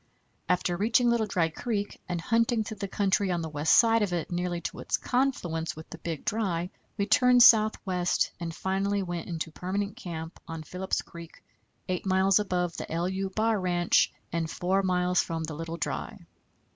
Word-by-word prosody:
After 180 -1 +1
reaching 230 +5 +3
Little 230 -2 +1
Dry 170 -4 +1
Creek 205 +4 -4
and 175 -1 -1
hunting 230 +4 +1
through 220 0 -7
the 200 - -4
country 195 0 +1
on 175 -2 -1
the 160 - -4
west 150 +1 +3
side 230 -1 +5
of 200 -4 0
it 170 -1 -3
nearly 175 0 -1
to - - -5
its - - -1
confluence 180 -11 -1
with 155 +1 -11
the 165 - -8
Big 165 -3 -5
Dry 185 -5 -1 0.3
we 200 - +1
turned 250 +2 +6
southwest, 215 -6 +4
and 170 -1 -4
finally 195 +3 -1
went 175 -2 -4
into 165 -2 -4
permanent 200 +5 -3
camp 165 -1 -7
on 165 -1 -6
Phillips 180 +4 -3
Creek, 170 -1 -12 0.4
8 185 +1 -2
miles 190 +1 +4
above 180 -4 -1
the - - -5
=LU= 185 +4 -1
bar 220 -1 +2
ranch 175 -1 +2 0.2
and 165 -1 -1
4 185 +4 0
miles 180 -1 +2
from 165 -1 -4
the 155 0 -5
Little 165 +2 -5
Dry. - - -4
180 Hz, 180 wpm, -28 LUFS, 170-205 Hz, 0.4 s, turned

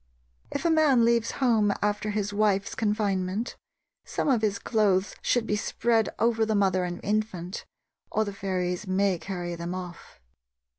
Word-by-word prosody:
If - - -4
a 335 - +4
man 290 -7 +4
leaves 235 -1 +2
home 220 -4 +3
after 210 +1 -1
his 205 -1 -2
wife's 200 -1 +1
confinement, 205 -1 -1 0.5
some - - -2
of 245 -5 +3
his 205 -2 +1
clothes 200 -3 +1
should 245 -2 +1
be 210 - 0
spread 225 +1 +1
over 225 -1 +2
the 220 -1 +1
mother 190 -2 +2
and 175 0 -5
infant, 205 -3 -2 0.5
or 220 - +1
the 200 - -5
fairies 185 -1 -2
may 190 -1 +1
carry 175 -2 -4
them 170 +1 -4
off. 180 -2 -9
205 Hz, 155 wpm, -27 LUFS, 185-220 Hz, 0.5 s, a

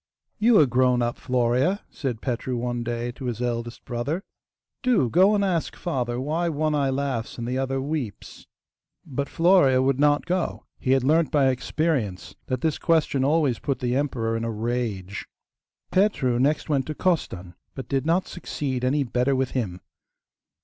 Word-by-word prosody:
'You 225 +1 +5
are 150 - +7
grown 125 -1 +2
up, 120 +1 -2
Florea,' 125 - +1
said 125 -6 -4
Petru 125 0 -2
one 120 0 -2
day 120 0 -3
to 130 +2 -9
his 120 -2 -3
eldest 120 -1 -3
brother; 140 +10 -3 0.6
'do 225 - +2
go 190 +5 +5
and 200 -1 +2
ask 175 -4 -1
father 125 -7 -2
why 160 +6 -1
one 155 0 0
eye 140 -2 +1
laughs 135 -4 -2
and 120 -1 -4
the 130 +1 -1
other 135 0 -1
weeps.' 135 -6 -5 0.6
But 140 -2 -3
Florea 165 -7 +4
would 135 0 +1
not 145 0 +3
go. 180 -1 -2
He 130 - +2
had 135 -2 +2
learnt 155 +4 +3
by 140 -3 +3
experience 125 - -1
that 130 -1 -2
this 160 -2 0
question 155 -5 +2
always 145 -4 +2
put 140 -2 -1
the 125 0 -1
emperor 125 -5 -1
in 115 - -2
a 115 - -1
rage. 110 -4 -3 0.6
Petru 160 - +2
next 145 +4 +1
went 140 -4 0
to 155 - -4
Costan, 95 - -1 0.2
but 135 - -6
did 135 -1 0
not 170 +4 +1
succeed 135 -7 -4
any 140 +3 +2
better 125 +2 +1
with 130 -1 0
him. 95 -9 -3
130 Hz, 170 wpm, -25 LUFS, 120-155 Hz, 0.6 s, are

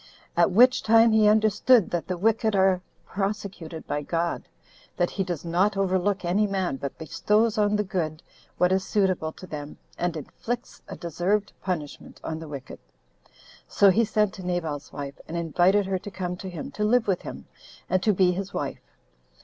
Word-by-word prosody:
At - - +4
which 245 +7 +5
time 225 +1 +5
he 220 -1 +5
understood 215 +1 +4
that 175 -2 -2
the 185 - -2
wicked 220 +2 +2
are 190 -1 +3 0.2
prosecuted 195 -5 -4
by 145 0 -2
God; 170 +3 -1 0.6
that 175 -1 +1
he 195 - -1
does 175 -4 -5
not 185 +5 +1
overlook 190 0 0
any 200 +5 +2
man, 190 -8 -1
but 140 0 -6
bestows 210 +8 +1
on 210 -1 +2
the 210 - +1
good 165 -5 -3 0.3
what 180 0 +3
is 190 0 +2
suitable 185 -7 0
to - - -11
them, 150 -4 -7 0.2
and 175 -2 -1
inflicts 235 - -6
a - - -7
deserved 180 +5 -1
punishment 160 -6 -5
on 160 0 -4
the 160 - -8
wicked. 140 -3 -8 0.9
So 200 -1 +5
he 230 +5 +3
sent 210 -3 +1
to 190 - -9
Nabal's 165 -5 -3
wife, 140 -1 -7
and 170 - -4
invited 175 +5 +3
her 190 -1 -1
to 205 - -8
come 180 -2 -4
to 190 +1 -7
him, 170 -4 -7
to 210 - -3
live 225 +2 +3
with 190 -3 0
him, - - -8 0.4
and 185 - +1
to 215 - +3
be 185 -2 +3
his 195 +2 -5
wife. - - -3
185 Hz, 180 wpm, -26 LUFS, 170-210 Hz, 0.9 s, which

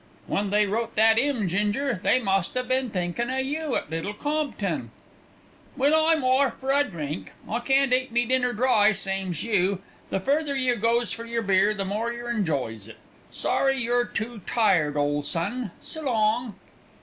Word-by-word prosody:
When 200 0 -1
they 210 +1 +3
wrote 225 +3 -2
that 225 +1 +5
'ymn, 250 -7 0
Ginger, 210 +6 0
they 250 - +3
must 195 -1 0
'ave 250 0 -1
been 260 -1 +1
thinkin' 185 +5 -2
o' 260 - -1
you 290 +2 -2
at - - -3
Little 165 +6 -3
Compton. 300 +4 -2 0.9
"Well, 285 +2 +3
I'm 320 -3 +3
orf 260 +1 +3
for 265 0 -2
a 285 +1 +4
drink; 155 - -6
I 230 - -1
can't 270 +1 +2
eat 255 -1 +1
me 240 +1 +2
dinner 250 0 +2
dry, 220 -3 +3
same's 190 -4 -3
you. 195 -4 +1 0.3
The - - -1
further 285 +7 0
yer 255 -2 +2
goes 235 +1 +1
for 230 - -5
yer 230 0 -2
beer 200 +1 +3
the 195 -1 -2
more 215 +4 -2
yer 240 0 -5
enjoys 140 - -2
it. 110 -1 -12 0.3
Sorry 270 0 0
you're 240 0 +1
too 225 -1 -5
tired, 165 -10 +2
ole 145 0 +1
son. 200 - -3
S' - - -7
long!" 230 -5 0
230 Hz, 175 wpm, -25 LUFS, 195-255 Hz, 0.9 s, that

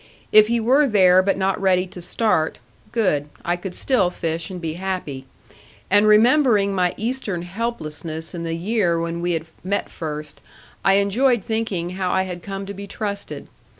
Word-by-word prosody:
If 215 0 +7
he 235 +1 +1
were 265 +6 +4
there 185 -5 +5
but 195 +1 0
not 195 0 0
ready 185 -1 +3
to 180 -1 -9
start, 175 -3 0 0.3
good; 150 -11 0 0.2
I 175 - +1
could 180 +1 -7
still 210 -10 +2
fish 165 -1 -3
and 185 -2 -6
be 165 -2 -3
happy. 175 -7 -4 0.6
And 205 +2 +5
remembering 215 -2 +4
my 180 -2 +1
Eastern 220 -6 -2
helplessness 165 -6 -4
in 170 - -5
the 165 -1 -3
year 175 -1 +1
when 170 0 -3
we 175 0 0
had 160 -1 -2 0.2
met 200 +2 -2
first, 150 -2 -6 0.4
I 195 - +4
enjoyed 210 +4 +2
thinking 205 -6 -2
how 185 0 -2
I 190 - +2
had 180 -2 -6
come 195 0 -6
to 200 - -6
be 200 +1 -8
trusted. 200 -1 -5
190 Hz, 175 wpm, -22 LUFS, 170-210 Hz, 0.6 s, If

